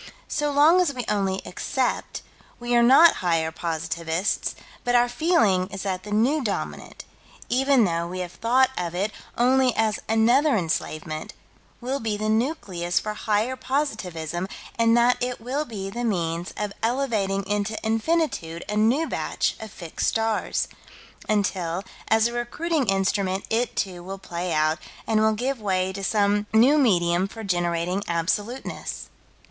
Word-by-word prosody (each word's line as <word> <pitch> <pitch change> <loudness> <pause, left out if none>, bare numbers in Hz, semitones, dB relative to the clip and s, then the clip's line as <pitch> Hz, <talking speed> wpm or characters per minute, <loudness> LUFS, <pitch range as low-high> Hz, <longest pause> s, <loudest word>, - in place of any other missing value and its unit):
So 295 -1 -1
long 310 +6 +6
as 295 -7 0
we 245 -2 -4
only 195 -2 0
accept, 255 +7 -2 0.4
we 240 0 -2
are 240 - +6
not 270 +8 +7
higher 165 -3 +1
positivists, 165 +2 -2 0.3
but 245 0 +1
our 240 0 +5
feeling 240 - +2
is 195 -1 -7
that 190 -2 -2
the 210 - -9
New 255 +8 +2
Dominant, 210 - -4 0.4
even 265 0 +4
though 170 -3 0
we 185 +1 -4
have 175 -1 -5
thought 255 +5 +2
of 175 -1 -3
it 200 +4 0 0.3
only 255 0 +3
as 220 -1 +1
another 240 +6 +4
enslavement, 155 -2 -3 0.5
will 260 +3 -2
be 220 -3 -2
the 215 +1 -2
nucleus 205 - 0
for 215 - -4
higher 215 +4 0
positivism 185 - -2 0.3
and 230 0 +4
that 240 +1 +3
it 250 0 -2
will 265 +7 -2
be 195 -6 -6
the 240 +3 -4
means 175 -5 -1
of 210 -1 -3
elevating 225 -6 0
into 205 +2 -1
infinitude 225 - 0
a 210 - -3
new 235 +9 +3
batch - - -1
of 220 - -7
fixed 170 -4 -4
stars 225 -1 0 0.6
until, 190 -4 0 0.2
as 220 0 +4
a 235 - 0
recruiting 275 +4 -1
instrument, 195 0 0
it, 235 +2 0
too, 185 -3 -2
will 190 +2 -6
play 180 -1 -4
out, 155 0 +2 0.3
and 220 -1 +2
will 220 0 +4
give 250 +2 -2
way 190 -2 0
to 195 +1 -6
some 205 0 +1
new 255 +7 +5
medium 180 -7 +3
for 225 +2 -9
generating 175 0 0
absoluteness. 205 +9 -2
210 Hz, 150 wpm, -24 LUFS, 185-245 Hz, 0.6 s, not